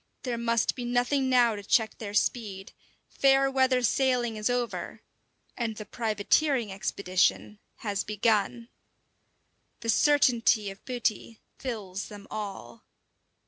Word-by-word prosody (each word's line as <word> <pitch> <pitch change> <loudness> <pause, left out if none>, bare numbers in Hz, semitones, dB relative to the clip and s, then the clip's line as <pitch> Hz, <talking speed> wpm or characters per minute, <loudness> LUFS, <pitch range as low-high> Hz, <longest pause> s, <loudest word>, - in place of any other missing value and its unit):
There 250 -2 -2
must 230 -1 +1
be 250 - -6
nothing 245 +3 +1
now 245 -3 +4
to 205 - -6
check 220 +2 +1
their 205 -2 -6
speed; 200 -5 -1 0.4
fair 270 0 +3
weather 260 -1 +2
sailing 245 -2 +1
is 215 +2 -1
over, 245 -1 -3 0.5
and 230 -3 -3
the 215 - -8
privateering 230 +3 0
expedition 195 +1 0 0.3
has 200 -1 -1
begun. 215 +2 0 1.1
The 230 - -4
certainty 235 -5 +3
of 195 - -14
booty 235 -3 -2 0.2
fills 205 -7 -5
them 205 -1 -11
all. 195 - -7
230 Hz, 120 wpm, -28 LUFS, 205-250 Hz, 1.1 s, now